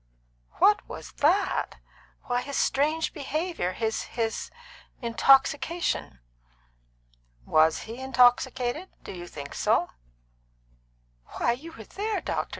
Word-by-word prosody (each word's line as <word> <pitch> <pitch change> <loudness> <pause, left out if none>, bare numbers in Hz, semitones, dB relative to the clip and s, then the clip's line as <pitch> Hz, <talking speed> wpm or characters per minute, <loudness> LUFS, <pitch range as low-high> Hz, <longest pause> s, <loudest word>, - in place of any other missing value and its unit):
"What 420 0 +3
was - - -8
that? 370 +7 +2 0.5
Why, 245 0 -1
his 280 +2 -4
strange 310 +4 +1
behaviour 305 - -2
his 220 +2 -1 0.2
his 225 -1 -1 0.5
intoxication." 270 - +2 1.3
"Was 155 +1 +3
he 230 +3 -8
intoxicated? 255 +4 +2
Did - - -8
you 175 0 -8
think 145 -4 -8
so?" - - +1 1.5
"Why, - - +2
you 305 +8 -6
were 225 - -10
there, 420 - -3
doctor. - - -3
265 Hz, 105 wpm, -27 LUFS, 230-320 Hz, 1.5 s, What